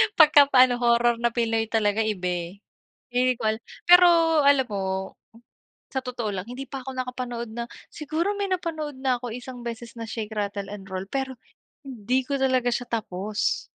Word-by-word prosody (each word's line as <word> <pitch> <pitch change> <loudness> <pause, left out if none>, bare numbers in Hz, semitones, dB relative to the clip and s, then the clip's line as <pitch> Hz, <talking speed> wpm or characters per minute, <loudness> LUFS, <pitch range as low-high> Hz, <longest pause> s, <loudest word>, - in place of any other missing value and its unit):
Pagka 300 -3 +7
pa 260 -2 +7
ano 250 -1 +2
horror 235 0 +3
na 235 0 0
pinoy 225 -2 0
talaga 215 -1 +1
iba 195 -4 -2
eh. 175 -1 -3 0.6
Hindi 250 +1 +2
ko - - -7
alam 220 +2 -2 0.3
pero 355 0 +9 0.4
alam 280 -2 +5
mo, 200 -2 -3 1.1
sa 265 - -1
totoo 245 -4 -4
lang 190 +1 -5
hindi 255 +2 -6
pa 270 +1 -6
ako 265 - -6
nakapanood 250 -2 -4
na 235 +1 -4 0.3
siguro 320 +6 -2
may 400 -1 -1
napanood 315 -6 -3
na 255 -2 0
ako 245 - -5
isang 250 0 -8
beses 235 0 -6
na 230 - -5
Shake 220 -1 -5
Rattle 200 -1 -3
and 200 -2 -8
Roll 185 0 -4
pero 265 -1 -3 0.5
hindi 255 0 -1
ko 280 +1 -2
talaga 255 -2 +2
siya 245 +1 -2
tapos. 210 -1 -2
245 Hz, 180 wpm, -25 LUFS, 220-265 Hz, 1.1 s, pero